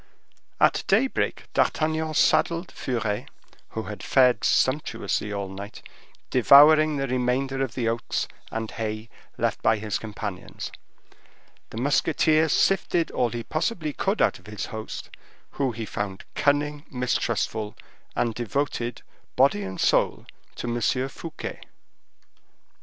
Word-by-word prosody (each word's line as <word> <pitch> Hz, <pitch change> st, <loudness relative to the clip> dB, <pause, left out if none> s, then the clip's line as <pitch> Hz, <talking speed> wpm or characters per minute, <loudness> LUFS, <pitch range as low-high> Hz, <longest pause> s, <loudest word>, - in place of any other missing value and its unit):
At -, -, +4 dB
daybreak 235 Hz, +7 st, +1 dB
D'Artagnan 155 Hz, 0 st, +1 dB
saddled 170 Hz, +4 st, +2 dB
Furet, 110 Hz, -5 st, -2 dB, 0.4 s
who -, -, -4 dB
had -, -, -7 dB
fared 125 Hz, -1 st, +4 dB
sumptuously 115 Hz, -7 st, +1 dB
all 100 Hz, -1 st, -3 dB
night, 100 Hz, +2 st, -9 dB, 0.5 s
devouring 150 Hz, +4 st, +7 dB
the 135 Hz, -, 0 dB
remainder 130 Hz, +2 st, 0 dB
of 125 Hz, -4 st, -4 dB
the 120 Hz, -3 st, -1 dB
oats 115 Hz, +1 st, -1 dB, 0.2 s
and 110 Hz, 0 st, -4 dB
hay 110 Hz, 0 st, -4 dB, 0.3 s
left -, -, 0 dB
by 110 Hz, -, +3 dB
his 105 Hz, -1 st, -2 dB
companions. 105 Hz, -3 st, -6 dB, 1.0 s
The -, -, -9 dB
musketeer 155 Hz, +4 st, +3 dB
sifted 175 Hz, -2 st, +2 dB
all 120 Hz, -, +1 dB
he 120 Hz, 0 st, -4 dB
possibly 155 Hz, -, -2 dB
could 195 Hz, +3 st, +1 dB
out -, -, +1 dB
of -, -, -22 dB
the 105 Hz, -3 st, -5 dB
host, 110 Hz, 0 st, -7 dB, 0.4 s
who 135 Hz, -2 st, 0 dB
he 115 Hz, 0 st, -5 dB
found 100 Hz, -2 st, -4 dB
cunning, 145 Hz, 0 st, +1 dB
mistrustful, 115 Hz, -4 st, -1 dB, 0.4 s
and 115 Hz, -1 st, +1 dB
devoted, 120 Hz, 0 st, -2 dB, 0.3 s
body 130 Hz, -5 st, +4 dB
and 95 Hz, -1 st, -6 dB
soul, -, -, +2 dB, 0.3 s
to -, -, -5 dB
M. 120 Hz, 0 st, -1 dB, 0.3 s
Fouquet. 160 Hz, +3 st, -7 dB
125 Hz, 125 wpm, -25 LUFS, 110-150 Hz, 1.0 s, devouring